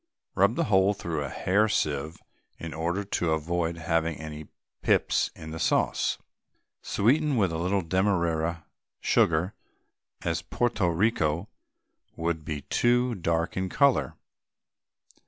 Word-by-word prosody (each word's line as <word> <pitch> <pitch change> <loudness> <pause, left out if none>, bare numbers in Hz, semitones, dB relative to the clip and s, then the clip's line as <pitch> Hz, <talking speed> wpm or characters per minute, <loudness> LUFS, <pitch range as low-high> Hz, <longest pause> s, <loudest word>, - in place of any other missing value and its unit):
Rub 100 +4 +3
the - - +1
whole 95 0 +3
through 80 -6 -3
a 70 - -4
hair 100 +10 +1
sieve 75 -3 -1 0.4
in 85 -1 -7
order 85 +5 -1
to 85 -4 0
avoid 85 +1 -1
having 80 -1 0
any 80 -1 -8 0.3
pips - - +2
in 80 0 -9
the 80 - -6
sauce. - - +1 0.6
Sweeten 140 +6 +2
with 95 -6 +2
a 80 - -3
little 95 +2 0
Demerara 85 -3 0 0.3
sugar, 85 +4 +2 0.7
as - - -1
Porto 120 -6 0
Rico 85 -1 +1 0.7
would 80 -1 -2
be 75 -2 -4
too 120 - +2
dark 85 -4 -1
in 95 0 -1
colour. 140 +3 +2
85 Hz, 125 wpm, -27 LUFS, 80-100 Hz, 0.7 s, Rub